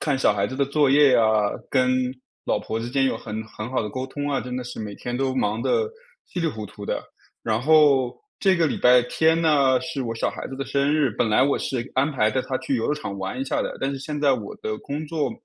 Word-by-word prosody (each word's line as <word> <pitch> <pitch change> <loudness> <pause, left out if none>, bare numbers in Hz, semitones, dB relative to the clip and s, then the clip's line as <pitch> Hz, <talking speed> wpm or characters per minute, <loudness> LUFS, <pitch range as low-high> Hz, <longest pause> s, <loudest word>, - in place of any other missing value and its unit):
看 145 -3 0
小 130 - +4
孩 100 0 0
子 130 - -6
的 140 - +2
作 140 0 +2
业 140 -2 +6
啊， 115 - +4 0.5
跟 130 -1 +3 0.6
老 - - +1
婆 110 +1 -4
之 120 - -4
间 135 +1 +1
有 130 - 0
很 110 0 -5
很 110 +1 -7
好 130 - 0
的 105 - -4
沟 130 +2 -4
通 145 +2 -4
啊， 140 - 0
真 125 0 -5
的 125 - -4
是 125 -2 -7
每 105 -2 -5
天 120 +3 -5
都 130 0 0
忙 110 -3 0
得 450 - +1 0.4
稀 180 - -5
里 165 - +1
糊 110 -8 -4
涂 105 0 -9
的。 - - -2 0.4
然 110 0 0
后 140 -4 +4 0.2
这 190 -2 +3
个 165 - +3
礼 - - -1
拜 125 0 +6
天 160 +6 +2
呢 140 -5 +3
是 160 -5 -4
我 115 -1 -3
小 115 - -1
孩 - - -7
子 135 - -8
的 135 - -3
生 140 +1 +1
日， 150 -5 +2
本 110 +2 0
来 110 +4 +4
我 140 +1 +2
是 120 -3 -3
安 135 +4 +2
排 110 -6 +2
带 130 - 0
他 130 - -2
去 140 -5 -1
游 115 - -1
乐 150 - +1
场 100 -10 -6
玩 95 +6 -4
一 - - -1
下 - - -1
的。 - - -4
但 135 - 0
是 135 - -4
现 150 +2 -5
在 145 -2 +3
我 110 -6 -4
的 110 0 -3
工 150 +2 -5
作， 155 -1 -1
130 Hz, 285 characters per minute, -24 LUFS, 115-145 Hz, 0.6 s, 业